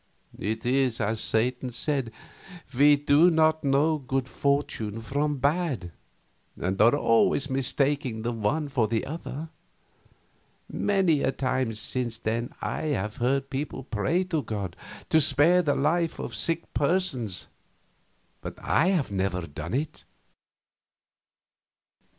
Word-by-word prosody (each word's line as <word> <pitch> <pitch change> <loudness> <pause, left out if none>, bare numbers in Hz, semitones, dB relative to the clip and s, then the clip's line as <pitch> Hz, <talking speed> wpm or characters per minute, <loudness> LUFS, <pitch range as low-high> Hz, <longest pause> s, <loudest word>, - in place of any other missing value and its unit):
It 110 +3 -3
is 130 -1 +2
as 110 +1 -1
Satan 125 +3 0
said, 125 0 -1 0.6
we 145 +3 +6
do 145 +4 +4
not 160 -1 +3
know 145 +3 +2
good 135 -1 -2
fortune 130 -7 -1
from 145 +5 -1
bad, 140 - -1 0.7
and 95 +2 -1
are 115 +5 +6
always 135 +1 +2
mistaking 135 -2 0
the 120 - -1
one 120 +8 -1
for 125 -6 +1
the 110 0 -1
other. 155 0 -6 1.2
Many 190 -7 +1
a - - +1
time 130 -4 -1
since 120 +1 -2
then 115 +1 -2
I - - -3
have 105 +2 -4
heard 135 +3 0
people 135 -1 -4
pray 125 - 0
to 170 -5 -1
God 100 -8 -5 0.4
to 160 - +5
spare 155 +5 +4
the 145 -4 +1
life 165 +4 +1
of 120 - -6
sick 165 +10 -2
persons, 130 - 0 1.0
but - - -7
I 165 - +2
have 175 - +1
never 95 -2 -1
done 80 +9 -5
it. 145 +3 -3
135 Hz, 125 wpm, -26 LUFS, 115-150 Hz, 1.2 s, we